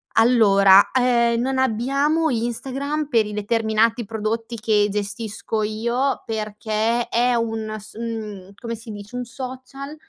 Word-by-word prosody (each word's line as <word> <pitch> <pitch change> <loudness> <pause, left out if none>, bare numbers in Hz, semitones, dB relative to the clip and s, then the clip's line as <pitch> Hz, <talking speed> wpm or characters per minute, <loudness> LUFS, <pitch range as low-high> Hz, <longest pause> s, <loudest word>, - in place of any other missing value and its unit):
Allora, 200 -4 +6
uhm, 235 -2 +3
non 260 +2 0
abbiamo 275 +7 +1
Instagram 270 +6 -2
per 230 -6 +2
i 210 - -6
determinati 220 +2 +1
prodotti 225 +2 -3
che 210 -2 +2
gestisco 210 +2 -3
io, 235 +6 -1
perché 220 +2 -1
è 240 +1 +2
un 225 -2 -2
s 215 +1 -11
mhmm, 215 -4 -6
come 230 -1 -5
si 225 +1 -12
dice, 205 +3 -9
un 250 0 -3
social 260 +3 -8
230 Hz, 130 wpm, -22 LUFS, 215-250 Hz, -, Allora